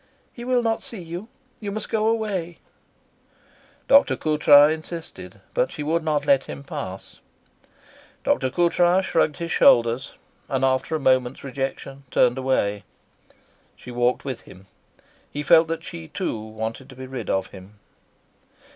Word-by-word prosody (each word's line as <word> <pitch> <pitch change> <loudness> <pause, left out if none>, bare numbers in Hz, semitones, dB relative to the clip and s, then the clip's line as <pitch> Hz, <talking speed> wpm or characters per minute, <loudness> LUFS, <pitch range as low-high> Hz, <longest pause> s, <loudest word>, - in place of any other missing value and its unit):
"He 240 - -9
will 250 -1 +1
not 225 -1 0
see 225 - -5
you. 170 +5 -7 0.3
You 205 -2 -5
must 215 +1 -4
go 220 0 0
away." 200 -7 -1 1.3
Dr. 280 +1 +5
Coutras 150 -1 +5
insisted, 160 +1 -8
but - - +1
she 150 - -5
would 160 +2 0
not 150 -2 0
let 140 -2 +3
him 140 - -8
pass. 95 -8 -7 1.0
Dr. 130 - +1
Coutras 175 +3 +2
shrugged 160 -5 +1
his 170 -1 -4
shoulders, 120 +3 +4 0.3
and 135 -1 +1
after 130 +4 0
a - - -1
moment's 130 -2 +1
rejection 135 0 -5
turned 125 0 +3
away. 105 -6 0 0.9
She 125 - -11
walked 120 +2 0
with 130 -4 -4
him. 95 +1 -15 0.6
He 145 - -5
felt 160 +3 +6
that 165 0 -4
she 165 -1 -8
too 170 - -3
wanted 110 +4 -6
to 130 - -12
be 130 +1 -8
rid 130 -4 -6
of 95 -1 -1
him. 95 +2 -13
145 Hz, 145 wpm, -23 LUFS, 130-170 Hz, 1.3 s, felt